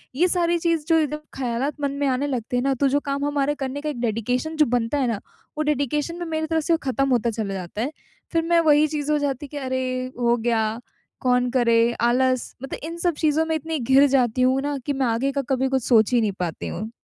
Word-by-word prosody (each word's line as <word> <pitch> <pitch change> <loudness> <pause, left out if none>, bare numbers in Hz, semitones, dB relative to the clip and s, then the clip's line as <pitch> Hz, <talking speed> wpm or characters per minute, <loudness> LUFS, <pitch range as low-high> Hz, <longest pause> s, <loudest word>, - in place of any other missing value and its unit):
ये 345 +6 +3
सारी 345 -1 +1
चीज़ 330 -2 0
जो 330 - +4
एकदम 300 0 -1 0.2
ख़यालात, 260 +2 -1
मन 280 - 0
में 285 - +2
आने 265 +2 0
लगते 245 -3 -3
हैं 245 - 0
ना 275 0 +2
तो 280 - +5
जो 285 +2 +2
काम 280 0 -1
हमारे 290 0 0
करने 275 +1 -4
का 305 - -3
एक 270 -5 -5
डेडिकेशन 245 +7 -1
जो 305 - +5
बनता 240 +2 0
है 270 -3 +1
ना, 225 -4 -1 0.4
वो 310 - +1
डेडिकेशन 295 +2 -1
में 345 - -3
मेरी 315 -1 -2
तरफ़ 320 0 0
से 335 -1 +3
ख़त्म 275 0 0
होता 240 -2 +2
चला 215 -3 -3
जाता 190 +3 -5
है। 270 - -1 0.4
फ़िर 330 -1 +2
मैं 340 0 +3
वही 300 +1 +5
चीज़ 300 0 -2
हो 300 - +3
जाती 285 0 -2
कि 290 - -8
अरे! 260 -2 -2 0.4
हो 240 0 +3
गया, 225 -1 0 0.4
कौन 250 -1 +2
करे 235 -3 +3 0.2
आलस 255 +1 +1
मतलब 270 - -5
इन 330 +2 -5
सब 345 0 +1
चीजों 315 0 +2
में 320 0 -1
इतनी 315 +1 -3
घिर 265 +3 +5
जाती 255 -3 +2
हूँ 260 +1 +3
ना 285 0 -2
कि 285 - 0
मैं 265 -1 0
आगे 240 +4 0
का 280 - -1
कभी 265 0 +1
कुछ 265 -2 0
सोच 225 -1 +4
ही 240 - +4
नहीं 215 -2 +1
पाती 175 -3 -3
हूँ। 215 +4 -5
270 Hz, 245 wpm, -23 LUFS, 240-300 Hz, 0.4 s, तो